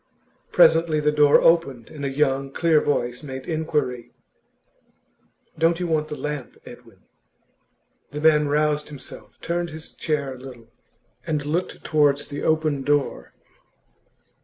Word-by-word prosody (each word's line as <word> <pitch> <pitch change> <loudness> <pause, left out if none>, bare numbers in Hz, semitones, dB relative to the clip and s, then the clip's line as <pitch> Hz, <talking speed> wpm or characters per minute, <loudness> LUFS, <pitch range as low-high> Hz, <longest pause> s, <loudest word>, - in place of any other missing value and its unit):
Presently 160 -1 +4
the 150 0 +2
door 150 -1 +5
opened, 150 -8 +2
and 145 -2 -8
a 140 - -1
young, 135 -1 0
clear 160 0 +3
voice 125 -4 -1
made 130 -3 -7
inquiry: 150 -7 -2 1.5
'Don't 165 +1 +2
you 180 - -2
want 155 -2 0
the 150 -1 -6
lamp, 150 -3 -5
Edwin?' - - -14 1.1
The 150 - -6
man 150 -1 +4
roused 150 0 0
himself, 120 -7 -12
turned 170 0 -2
his 155 0 -9
chair 150 -4 -2
a 130 - -12
little, 120 -3 -12 0.6
and 150 -2 -1
looked 165 +5 -3
towards 145 -3 +2
the 145 0 -5
open 155 -3 +1
door. 145 +1 -1
150 Hz, 135 wpm, -23 LUFS, 135-155 Hz, 1.5 s, door